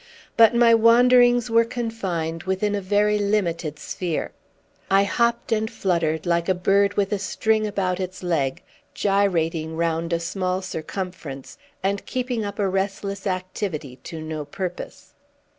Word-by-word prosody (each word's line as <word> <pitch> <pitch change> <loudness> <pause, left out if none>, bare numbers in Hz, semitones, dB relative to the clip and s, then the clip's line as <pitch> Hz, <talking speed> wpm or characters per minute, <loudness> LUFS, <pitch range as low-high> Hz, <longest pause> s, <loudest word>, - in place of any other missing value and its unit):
But 230 0 +6
my 235 -1 +6
wanderings 245 +1 +5
were 230 0 +5
confined 195 -9 -3
within 190 +2 0
a 205 - -1
very 210 +2 +2
limited 175 -7 -1
sphere. 170 +1 -3 0.6
I 195 +1 +5
hopped 235 +4 0
and 220 0 +1
fluttered, 170 -8 -1
like 170 0 +1
a 185 - +3
bird 200 +3 +2
with 200 0 0
a 205 - -1
string 215 +2 0
about 190 -3 -1
its 185 0 -5
leg, 150 -7 -1 0.3
gyrating 165 -5 0
round 165 0 -1
a 170 - +1
small 185 +2 -2
circumference, 165 -5 -6 0.2
and 200 +1 0
keeping 250 -3 -2
up 200 0 -5
a 200 - +1
restless 195 +1 -2
activity 185 -7 -4
to 165 -2 -6
no 155 -1 -5
purpose. 185 +3 -7
195 Hz, 140 wpm, -23 LUFS, 170-210 Hz, 0.6 s, But